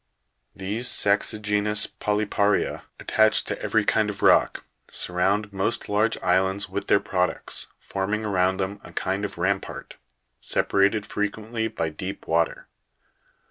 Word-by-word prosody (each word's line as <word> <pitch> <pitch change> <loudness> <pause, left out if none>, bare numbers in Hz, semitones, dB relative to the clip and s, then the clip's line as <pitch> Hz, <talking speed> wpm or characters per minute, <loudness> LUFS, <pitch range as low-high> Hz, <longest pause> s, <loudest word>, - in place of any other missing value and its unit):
40. 95 - -9
These 110 +6 +1
sa'xigenous 105 0 +3
polypa'ria, 105 0 -1
attached 110 0 +2
to - - -5
every - - +1
kind - - +2
of - - -6
rock, - - +4 0.3
surround 100 +4 -1
most 95 +4 -1
large 105 +2 +1
islands 95 +3 +1
with 100 - -5
their - - +4
products, 90 -2 -1
forming 105 +3 -3
around 95 -2 +1
them 100 +2 -3
a - - -13
kind 95 +2 -2
of 100 -3 -5
rampart, 95 +3 -3 0.4
separated 100 +1 +1
frequently 110 +2 -3
by 95 -8 -3
deep 95 +5 -7
water. 85 0 0
100 Hz, 130 wpm, -24 LUFS, 95-105 Hz, 0.4 s, rock